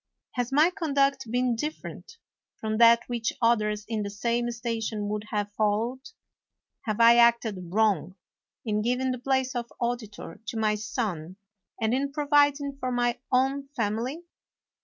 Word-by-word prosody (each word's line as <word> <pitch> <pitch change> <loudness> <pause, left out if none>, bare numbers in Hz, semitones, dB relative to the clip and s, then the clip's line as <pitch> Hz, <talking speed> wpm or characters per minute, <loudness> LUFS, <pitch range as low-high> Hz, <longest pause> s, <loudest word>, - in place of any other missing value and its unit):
Has 245 0 -2
my 305 +6 +4
conduct 275 - 0
been 245 0 +1
different 305 - -6 0.4
from 215 0 -2
that 235 0 +7
which 235 -2 -2
others 210 -3 +1
in 220 -1 -2
the 200 - -3
same 235 +4 -1
station 225 -2 -3
would 210 0 -3
have 205 -1 -2
followed? 220 +5 -1 0.8
Have 215 -1 -2
I 235 +1 +7
acted 230 -6 +3
wrong 195 -4 +1 0.5
in 210 -1 0
giving 250 +3 0
the 255 - -4
place 265 0 0
of 240 -1 -4
auditor 235 -3 -4
to 225 - -4
my 215 -1 +2
son 210 -6 -3 0.4
and 220 0 +1
in 275 +2 0
providing 285 -1 +2
for 255 -2 -2
my 240 -1 0
own 270 +2 +1
family 235 +7 -2
235 Hz, 145 wpm, -27 LUFS, 215-260 Hz, 0.8 s, that